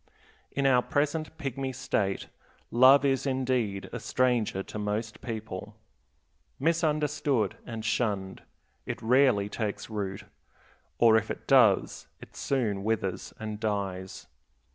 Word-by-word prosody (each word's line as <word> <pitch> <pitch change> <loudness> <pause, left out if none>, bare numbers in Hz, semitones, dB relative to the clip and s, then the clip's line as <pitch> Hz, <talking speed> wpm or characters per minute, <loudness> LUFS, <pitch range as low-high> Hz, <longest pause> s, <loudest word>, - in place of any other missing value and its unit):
In 140 - -1
our 125 -2 +5
present 150 +4 -1
pygmy 135 -3 -4
state 100 -6 -1 0.5
love 130 +4 +7
is 135 0 +1
indeed 125 -7 -1
a 120 - -3
stranger 115 -3 +1
to 105 - -7
most 105 +2 -3
people. 110 -3 -6 0.8
Misunderstood 150 - +1
and 115 -1 -5
shunned, 105 -4 -1 0.5
it - - -3
rarely 125 -3 +3
takes 105 0 -4
root; 100 -3 -4 0.7
or 115 -2 +6
if 110 0 -1
it - - -5
does, - - +4
it - - -14
soon 110 -8 -1
withers 100 -4 -2
and 110 -1 -5
dies. 100 -3 -3
115 Hz, 120 wpm, -28 LUFS, 105-135 Hz, 0.8 s, love